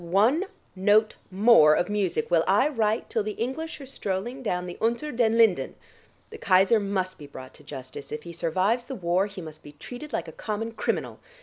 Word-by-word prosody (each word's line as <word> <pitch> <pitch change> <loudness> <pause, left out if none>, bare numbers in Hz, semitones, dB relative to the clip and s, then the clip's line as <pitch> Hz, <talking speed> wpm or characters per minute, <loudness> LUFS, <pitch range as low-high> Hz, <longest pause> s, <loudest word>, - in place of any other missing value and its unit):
Not 170 - -10
one 230 - +3 0.3
note 210 +3 +3 0.2
more 190 -6 +6
of 175 - 0
music 195 -6 -1
will 165 -2 +4
I 205 +9 +4
write 225 -5 0
till 225 - -1
the 210 0 -3
English 285 +8 -4
are - - -8
strolling 240 0 -4
down 180 -7 -2
the 175 - -8
Unter 235 +7 0
den 230 -2 +2
Linden. 195 -12 +3 0.6
The - - -9
Kaiser 190 +4 +4
must 190 -3 -2
be 145 - -10
brought 130 -2 -11
to - - -15
justice; 135 -1 -9
if 150 0 -5
he 170 - -9
survives 185 +9 0
the 270 - -6
war 185 0 +1
he 200 -2 -9
must 155 -2 -10
be 145 - -13
treated 245 - -9
like - - -3
a - - -7
common 220 +1 -4
criminal. 225 - -3
200 Hz, 205 wpm, -26 LUFS, 175-230 Hz, 0.6 s, more